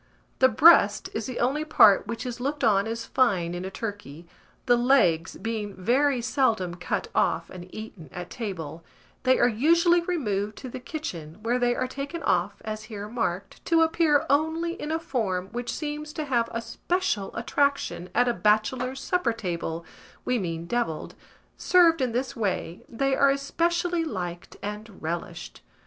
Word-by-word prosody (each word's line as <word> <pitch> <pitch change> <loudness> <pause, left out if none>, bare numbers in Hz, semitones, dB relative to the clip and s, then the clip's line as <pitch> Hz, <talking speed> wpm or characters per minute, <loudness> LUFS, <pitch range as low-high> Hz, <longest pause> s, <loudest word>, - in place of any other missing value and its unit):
The 260 - +6
breast 220 -6 +5
is 220 - -3
the 255 - -5
only 275 +5 +1
part 220 -11 +5
which 230 +2 -4
is 245 -1 -5
looked 280 +3 -2
on 200 -1 +3
as 230 0 -4
fine 190 -10 +1
in 175 +1 -4
a 190 - -4
turkey, 195 -7 -7 0.4
the 245 - +5
legs 235 -10 +3
being 215 -3 -4
very 250 +7 +2
seldom 225 -9 +1
cut 180 -1 -3
off 165 +1 +1
and 180 -1 -9
eaten 205 -8 -9
at 175 0 -7
table: 170 -8 -5 0.4
they 260 0 +4
are - - +4
usually 335 +9 +4
removed 215 - -2
to 260 - -7
the 250 - -7
kitchen, 180 - -6
where 240 +2 +1
they 245 0 +2
are 255 - -1
taken 280 +6 -6
off, - - 0
as 215 0 -5
here 210 -2 -7
marked, 200 -5 -3
to 330 -1 +4
appear 320 -3 +3
only 320 +4 +1
in 305 -2 -5
a 320 - +1
form 200 - -2
which 240 +1 -3
seems 300 0 -5
to 310 - -3
have 240 -4 +1
a 230 0 -3
special 350 - -1
attraction 260 -6 0
at 245 +2 +4
a 240 - +2
bachelor's 240 +5 +1
supper 360 -5 0
table, 170 -6 -4 0.4
we 250 -1 +1
mean 165 -3 -4
devilled: 170 -7 -2 0.4
served 335 -4 +4
in 255 -2 +1
this 255 +4 -2
way, 195 -6 -2
they 270 +3 0
are 280 - +4
especially 340 +5 0
liked 180 - -5
and 210 0 -6
relished. 160 - -5
235 Hz, 165 wpm, -26 LUFS, 195-280 Hz, 0.4 s, The